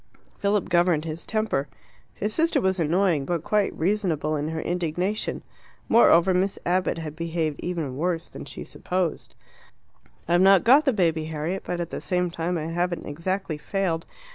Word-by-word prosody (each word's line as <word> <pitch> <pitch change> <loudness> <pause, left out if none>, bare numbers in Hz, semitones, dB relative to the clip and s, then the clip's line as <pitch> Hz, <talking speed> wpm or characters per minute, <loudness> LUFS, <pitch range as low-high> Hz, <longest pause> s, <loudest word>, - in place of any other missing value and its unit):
Philip 200 0 +1
governed 175 -3 +3
his 160 +1 -6
temper. 215 -10 0 0.5
His 210 +1 -2
sister 330 +1 +2
was 190 -1 0
annoying, 170 -1 +2
but 170 +2 -2
quite 210 +1 +1
reasonable 165 -5 0
in 150 0 -2
her 160 0 -3
indignation. 180 +4 -2 0.4
Moreover, 190 -5 +5
Miss 190 +2 +1
Abbott 180 0 +1
had 155 -2 -6
behaved 165 -2 -2
even 165 -7 -3
worse 170 +1 -1
than - - -9
she - - -7
supposed. 180 -3 -3 0.9
"I've 175 +1 +3
not 195 -1 +6
got 275 +6 +6
the 270 - +4
baby, 165 -6 +1
Harriet, 160 +4 -3
but 175 - -3
at 170 -1 -4
the - - -4
same 180 -2 0
time 170 +1 -2
I 155 - -3
haven't 175 +1 -2
exactly 170 +1 -3
failed. 175 -1 -2
175 Hz, 165 wpm, -25 LUFS, 160-190 Hz, 0.9 s, not